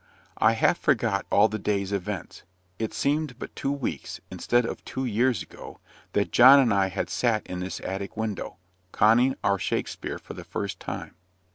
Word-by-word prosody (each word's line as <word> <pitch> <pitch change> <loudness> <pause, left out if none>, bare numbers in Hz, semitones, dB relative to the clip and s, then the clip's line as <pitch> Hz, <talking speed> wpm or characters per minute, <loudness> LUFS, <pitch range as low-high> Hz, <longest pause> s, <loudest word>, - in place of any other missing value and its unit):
I 110 +1 +5
half 115 +9 +2
forgot 115 -8 +1
all 105 +2 +5
the 110 0 -4
day's 100 -1 -1
events 100 -1 -4 0.4
it 110 -1 -2
seemed 145 -2 -1
but - - -8
two 135 - -2
weeks, 130 - -4
instead 120 0 +1
of - - -5
two 130 0 -4
years 120 +1 +1
ago, - - -12 0.3
that 100 - +1
John 130 +3 +9
and 120 -6 +3
I 100 -1 +3
had 95 - -3
sat 115 -3 0
in 90 - -5
this 90 +1 -4
attic 100 +2 -5
window, 110 -4 -4 0.3
conning 120 +5 +4
our 100 -1 +2
Shakspeare - - -3
for - - -10
the - - -9
first 100 -1 -4
time. - - -6
110 Hz, 175 wpm, -26 LUFS, 100-125 Hz, 0.4 s, John